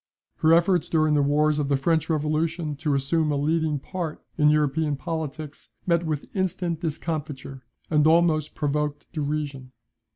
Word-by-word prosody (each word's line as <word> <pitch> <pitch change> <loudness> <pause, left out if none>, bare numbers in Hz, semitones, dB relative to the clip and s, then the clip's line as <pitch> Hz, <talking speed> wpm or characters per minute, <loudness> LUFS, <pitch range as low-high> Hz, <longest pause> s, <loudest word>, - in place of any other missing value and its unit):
Her 160 - +3
efforts 175 -1 +2
during 155 -2 +2
the 145 - +3
wars 150 +1 +2
of 140 -1 -1
the 140 - +3
French 160 +3 +1
revolution 155 +1 -1
to 150 -1 0
assume 150 +3 +1
a - - +1
leading 155 +1 +1
part 165 +2 -5
in 150 -1 +4
European 150 0 +1
politics, 155 -1 -6 0.2
met 170 -1 +1
with 155 +3 -4
instant 180 -3 -1
discomfiture, 150 -4 -4 0.3
and 150 -1 +3
almost 160 -2 +3
provoked 150 0 -2
derision. 145 -4 -3
155 Hz, 150 wpm, -25 LUFS, 145-165 Hz, 0.3 s, in